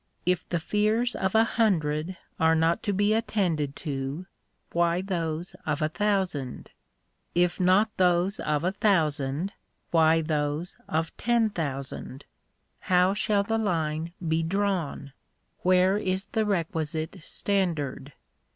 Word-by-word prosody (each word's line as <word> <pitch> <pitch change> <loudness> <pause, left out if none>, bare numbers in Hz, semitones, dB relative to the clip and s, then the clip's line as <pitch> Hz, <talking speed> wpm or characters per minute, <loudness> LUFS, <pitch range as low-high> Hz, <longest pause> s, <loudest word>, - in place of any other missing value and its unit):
If 180 -1 0
the 175 - 0
fears 215 +7 +1
of 190 +2 -1
a 220 - +7
hundred 175 -7 0 0.2
are 160 0 +4
not 165 +1 +2
to - - +4
be 205 +2 +2
attended 180 -10 0
to, 140 +4 -3 0.5
why 170 0 +2
those 170 -3 -3
of 150 - -1
a 155 - +1
thousand? 190 - -1 0.6
If 175 0 +2
not 190 +4 +3
those 180 +2 +2
of 150 0 0
a 180 - +1
thousand, 160 -3 +1 0.4
why 160 -1 +4
those 155 +1 -2
of 160 +1 -1
ten 235 -2 +2
thousand? 140 -4 -5 0.5
How 180 +1 +3
shall 205 0 +1
the 225 +2 0
line 165 -5 -1 0.2
be 160 +1 +2
drawn? 170 -6 -1 0.5
where 185 +2 +4
is 190 0 -1
the 220 -1 -1
requisite 160 -2 -2
standard 155 -8 -2
175 Hz, 125 wpm, -27 LUFS, 155-200 Hz, 0.6 s, a